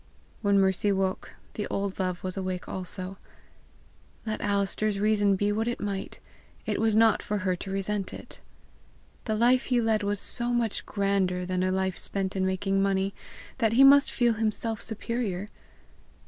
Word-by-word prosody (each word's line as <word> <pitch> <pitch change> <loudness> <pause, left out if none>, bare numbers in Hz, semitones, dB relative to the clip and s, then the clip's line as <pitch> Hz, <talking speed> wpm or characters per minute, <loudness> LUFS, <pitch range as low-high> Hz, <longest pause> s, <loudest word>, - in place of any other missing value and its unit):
When 200 -1 +3
Mercy 190 +1 +2
woke, 190 -1 -2 0.2
the 210 - -3
old 200 -1 -3
love 185 -1 -2
was 185 -1 -3
awake 185 -2 -4
also; 185 +1 -5 1.1
let 220 -1 -3
Alister's 200 0 0
reason 205 -1 +3
be 205 +2 +1
what 220 +2 -1
it 240 - -2
might, 200 -2 -4 0.5
it - - -1
was 220 -1 +2
not 220 -1 +5
for 210 - -2
her 185 -1 +2
to 195 - -7
resent 195 0 -2
it! - - -10 0.8
The 220 - 0
life 245 +3 +3
he 250 -2 +2
led 225 -2 +1
was 205 -1 -1
so 240 +3 -2
much 235 -3 -1
grander 195 -3 0
than 185 0 -1
a 185 0 +1
life 190 -1 -1
spent 195 -1 -3
in 190 -1 +1
making 195 +1 0
money, 195 0 +1 0.5
that 225 -2 +2
he 260 +4 +6
must 280 +1 +7
feel 240 -1 +2
himself 220 0 -2
superior! 220 -3 -3
200 Hz, 165 wpm, -27 LUFS, 190-220 Hz, 1.1 s, must